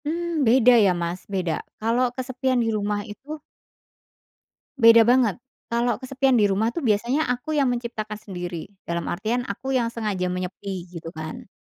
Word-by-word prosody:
Mmm, 335 0 -1
beda 250 +1 +6
ya 190 - +4
Mas, 170 +2 -2
beda. 180 -4 -1 0.2
Kalau 240 +3 +2
kesepian 260 0 -1
di 225 - 0
rumah 205 -1 -1
itu 290 +8 -9 1.4
beda 230 -1 +8
banget. 240 -3 +3 0.4
Kalau 235 +1 +1
kesepian 265 0 +1
di 210 -3 +4
rumah 205 +3 +1
itu, 325 +5 -4
biasanya 240 +7 +1
aku 270 +5 -3
yang 280 -3 +3
menciptakan 225 -3 -4
sendiri. 175 -5 -6 0.2
Dalam 170 0 -3
artian, 225 +7 -1
aku 265 +7 -4
yang 240 -2 +2
sengaja 210 -6 -2
menyepi 185 0 -5
gitu 165 -2 -8
kan. 155 0 -7
230 Hz, 155 wpm, -24 LUFS, 195-255 Hz, 1.4 s, beda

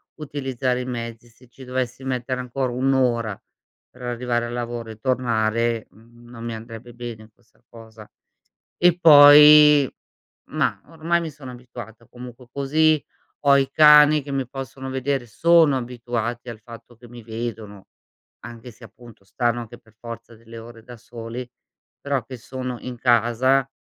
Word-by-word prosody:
utilizzare 135 -4 -3
i 125 - -6
mezzi, 115 -1 -7
se 125 +2 -22
ci 130 +3 -15
dovessi 125 0 -4
mettere 130 0 -3
ancora 125 0 -3
1 135 +2 0
ora 120 -6 0 0.5
per - - -19
arrivare 120 -1 -2
al 120 - -7
lavoro 120 -1 -5
e 110 - -10
tornare, 115 -2 -1
mhmm, 120 +2 -20
non 115 -1 -11
mi 115 -1 -5
andrebbe 115 +1 -11
bene 115 -2 -9
questa 120 0 -34
cosa. 110 -2 -14 0.7
E 175 0 +3
poi 150 -2 +8 0.6
mah, - - -1
ormai 165 +1 -1
mi 165 - -5
sono 135 -3 -11
abituata, 120 -2 -12
comunque 125 0 -12
così, 155 +2 +1 0.4
ho 140 0 +6
i 135 -1 0
cani 150 0 +6
che 140 - -8
mi 135 -2 -2
possono 135 0 -8
vedere, 130 -1 -2
sono 160 +3 +3
abituati 120 -1 -5
al 115 -2 -9
fatto 115 +1 -14
che 120 - -16
mi 120 0 -13
vedono, 110 -3 -7 0.5
anche 120 +1 -11
se, 115 +2 -20
appunto, 115 -1 -16
stanno 120 +2 -1
anche 115 - -11
per 110 - -25
forza 115 0 -10
delle 115 +1 -14
ore 115 0 -13
da 120 0 -12
soli, 115 +2 -9 0.5
però 140 -2 -1
che 130 - -9
sono 125 +1 -7
in 125 -1 -8
casa, 125 +3 +2
120 Hz, 155 wpm, -22 LUFS, 115-135 Hz, 0.7 s, poi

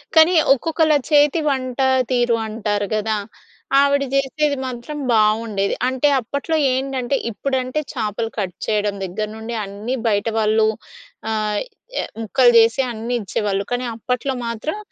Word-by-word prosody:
కానీ, 320 +3 +7 0.2
ఒక్కొక్కళ్ళ 315 +3 +1 0.2
చేతి 295 +2 +4
వంటా 265 -1 0 0.2
తీరు 240 -2 +2
అంటారు 210 -2 -2
గదా! 215 0 0 0.6
ఆవిడ 280 0 +3
జేసేది 280 +1 +1
మాత్రం 255 +4 -6
బావుండేది. 215 -2 +2
అంటే, 260 +3 +1
అప్పట్లో 280 +7 -3 0.2
ఏంటంటే, 265 0 -1 0.2
ఇప్పుడంటే 260 +4 -2
చేపలు 225 -1 -2
కట్ 190 -4 -3
చెయ్యడం 210 -1 0
దగ్గర 205 +4 -3
నుండి 225 +1 -5
అన్నీ 210 +6 -4
బయట 205 0 +1
వాళ్ళు 215 0 +3 0.6
ఆహ్, 215 -1 -1 0.4
ఎ - - -3 0.2
ముక్కలు 240 +3 +4
చేసి 230 +4 +4
అన్నీ 230 +2 -4
ఇచ్చేవాళ్ళు, 200 0 -1
కానీ 245 +1 -1
అప్పట్లో 250 +4 -2
మాత్రం 230 - -3
235 Hz, 130 wpm, -20 LUFS, 215-270 Hz, 0.6 s, కానీ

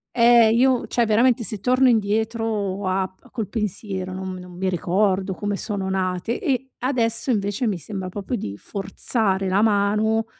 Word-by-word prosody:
Eh, 235 -1 +6
io 255 +1 +3
cioè, 240 - +1
veramente 235 +3 +3
se 215 -2 -2
torno 255 +4 +3
indietro 215 -3 0
a 190 0 0
p 185 - -30
a - - -17
col 220 -5 -4
pensiero 195 -3 -4
non 190 0 -5
m - - -7
non 180 0 -11
mi 190 - -1
ricordo 190 +2 0
come 205 -1 -2
sono 195 -2 -3
nate. 185 +3 -1
E 265 -1 -1
adesso, 235 -2 0
invece, 205 +1 0
mi 200 -4 -1
sembra 185 +1 -6
proprio 205 +6 -4
di 100 - -5
forzare 195 - -1
la 190 +3 +2
mano, 215 +1 +2
205 Hz, 175 wpm, -22 LUFS, 190-230 Hz, -, Eh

